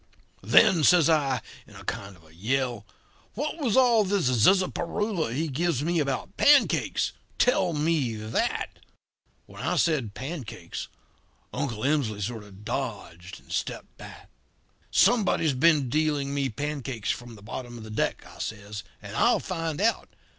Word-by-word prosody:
"'Then,' 190 -8 +5
says 170 0 +6
I, 135 -6 +1 0.3
in - - -16
a - - -11
kind 100 0 -5
of 80 -1 -21
yell, 120 +3 -2 0.5
'what 300 +7 -3
was 250 -7 +1
all 240 -4 +5
this 190 -9 +1
zizzaparoola 180 - +2
he 155 +7 -1
gives 150 0 0
me 170 +1 +1
about 135 -3 -2
pancakes? 290 -1 +4 0.3
Tell 190 -8 +3
me 150 -6 0
that.' 110 +1 -2 0.7
"When 100 +2 -11
I 170 +7 0
said 145 - +1
'pancakes' 125 - -6 0.7
Uncle 125 -5 -3
Emsley 135 -8 +1
sort 110 +2 -3
of 100 0 -15
dodged 90 -3 -5
and - - -17
stepped - - -4
back. - - -12 0.6
"'Somebody's 195 - +3
been 145 0 +4
dealing 145 0 0
me 140 -1 0
pancakes 135 -3 -3
from 120 -1 -7
the 100 - -15
bottom 120 +2 -7
of 115 - -9
the 110 - -9
deck,' 110 - -1
I - - -14
says, 100 -2 -5 0.2
'and - - -8
I'll - - +4
find 165 -4 -3
out. 225 +3 +1
140 Hz, 145 wpm, -27 LUFS, 110-170 Hz, 0.7 s, says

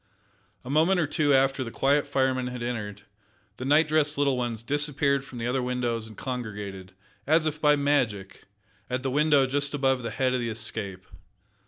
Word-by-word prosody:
A - - -7
moment 165 +5 +3
or 160 - +2
two 145 0 +1
after 135 0 +3
the 115 - -6
quiet 140 +4 +1
fireman 130 -2 0
had 125 -1 -5
entered, 105 -4 -5 0.5
the 130 - -6
night 150 +3 +4
dressed 150 -1 +1
little 140 -2 +2
ones 120 -3 -3
disappeared 140 +1 +1
from 130 -2 -10
the 115 - -4
other 125 +2 0
windows 120 -3 -2
and 110 - -13
congregated, 105 -7 -6 0.3
as 160 +2 +3
if 155 0 -3
by 150 -1 +5
magic, 125 -9 -1 0.4
at 130 +1 -2
the 135 - -1
window 145 -1 +4
just 140 +2 0
above 135 -2 +1
the 115 - -4
head 130 -1 0
of 130 - 0
the 120 -1 -2
Escape. 110 -4 -3
130 Hz, 185 wpm, -26 LUFS, 115-145 Hz, 0.5 s, by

